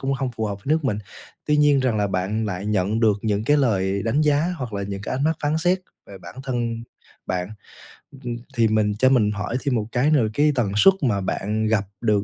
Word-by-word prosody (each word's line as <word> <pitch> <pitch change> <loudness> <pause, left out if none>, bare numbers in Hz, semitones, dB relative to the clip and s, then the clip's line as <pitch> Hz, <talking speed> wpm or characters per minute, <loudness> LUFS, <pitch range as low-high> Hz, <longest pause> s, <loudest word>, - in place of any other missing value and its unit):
cũng 135 0 -1
hông 130 -1 -2
phù 110 - -2
hợp 100 -1 -4
nước 155 +2 +1
mình, 110 -6 0 0.5
tuy 150 0 +3
nhiên 145 -2 +4
rằng 125 -4 +1
là 105 -1 +1
bạn 100 +4 -1
lại 95 0 -4
nhận 105 +1 0
được 105 -3 +3
những 105 -1 0
cái 145 +5 +4
lời 100 -7 +1
đánh 115 +6 +1
giá 150 +4 +2
hoặc 125 -6 -6
là 100 -1 -3
những 100 0 -5
cái - - -3
ánh 135 +3 -1
mắt 160 0 +1
phán 150 +2 +1
xét 180 +3 +2 0.3
về 100 -1 -11
bản - - -11
thân 120 -3 -2 0.4
bạn. 90 0 -2 0.8
Ừm, 120 -1 -4 0.2
thì 115 -1 +3
mình 110 -1 +1
cho 130 - +5
mình 110 -6 +3
hỏi 105 +3 -3
thêm 140 -3 0
một 110 -2 -1
cái 135 +5 +2
nữa 145 - +4
là 110 - 0
cái 150 +5 +3
tần 115 -6 0
suất 195 - +7
mà 110 -8 +1
bạn 105 +3 -1
gặp 110 -2 +1 0.2
được 105 -3 +2
115 Hz, 240 wpm, -23 LUFS, 105-135 Hz, 0.8 s, suất